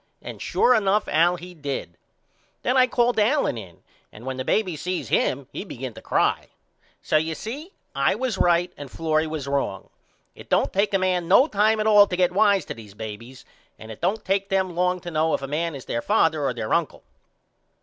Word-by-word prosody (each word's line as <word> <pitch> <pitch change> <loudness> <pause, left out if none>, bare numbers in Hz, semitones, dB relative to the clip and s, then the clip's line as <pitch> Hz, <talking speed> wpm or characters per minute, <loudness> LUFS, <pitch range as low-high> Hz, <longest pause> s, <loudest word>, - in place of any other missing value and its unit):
And - - -9
sure 250 - +3
enough 210 -2 +2
Al 170 +3 +3
he 180 +1 -10
did. 140 - -5 0.7
Then 250 - +1
I 255 -1 +5
called 240 -1 +1
Allen 245 - +2
in 95 -7 -11 0.3
and 110 +3 -13
when 130 0 -4
the 130 - -3
baby 185 +2 0
seen 180 +4 -3
him 135 +1 0
he - - -5
begin 130 - -7
to - - -12
cry. - - 0 0.6
So 155 - +2
you 160 +1 -1
see 285 - -7 0.2
I 140 +1 +2
was 235 -3 -2
right 175 +1 +2
and 145 -2 -8
Florrie 160 +1 0
was 155 -3 -5
wrong. 140 -9 -2 0.4
It - - -14
don't - - +1
take 200 +1 +1
a - - +5
man 185 -2 0
no 200 +9 +6
time 215 -4 +2
at 215 - 0
all 210 -2 +7
to 180 - -3
get 180 -1 +3
wise 200 0 +3
to - - -5
these 105 -3 -13
babys 110 +4 -9 0.3
and 110 0 -10
it 110 - -11
don't 195 +6 -1
take 195 +1 0
them 190 -3 0
long 180 +1 0
to 175 - -7
know 160 0 +1
if - - -6
a - - -3
man 160 +3 -2
is 135 - -9
there 115 - -2
father 160 - +2
or 125 - 0
their 110 -2 -3
uncle. - - -1
175 Hz, 210 wpm, -24 LUFS, 140-205 Hz, 0.7 s, all